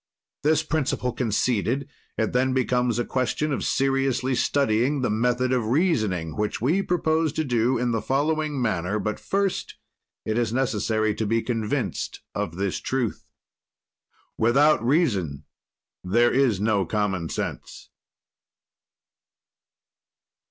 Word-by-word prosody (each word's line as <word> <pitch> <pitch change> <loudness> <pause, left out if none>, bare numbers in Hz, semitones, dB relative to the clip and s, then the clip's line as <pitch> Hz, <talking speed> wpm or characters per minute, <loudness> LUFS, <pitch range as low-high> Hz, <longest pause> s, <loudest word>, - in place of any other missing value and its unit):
"This 155 +2 +2
principle 145 -5 -1
conceded, 125 +3 0 0.3
it 110 - 0
then 130 +1 +2
becomes 125 -2 +1
a 120 - 0
question 135 +4 -1
of - - -2
seriously 135 -1 +1
studying 130 +1 +1
the 125 - 0
method 125 +3 +1
of 120 -4 0
reasoning, 110 - +1
which 105 0 -2
we 155 - +2
propose 160 -4 +1
to 160 - -1
do 125 -1 +1
in 120 0 0
the 115 -2 0
following 150 +4 0
manner 100 -4 0
but 105 0 -3
first 195 -1 -1 0.5
it 110 +2 0
is 115 -2 0
necessary 110 -3 0
to 110 0 -2
be 115 +1 +1
convinced 115 -4 -2
of 80 - -3
this 95 0 -2
truth." 130 -4 -2 1.1
Without 135 +3 +4
reason 100 - +1 0.6
there 120 +6 +3
is 125 -7 +2
no 105 -1 +2
common 95 -5 -1
sense. - - -6
125 Hz, 125 wpm, -25 LUFS, 110-135 Hz, 1.1 s, Without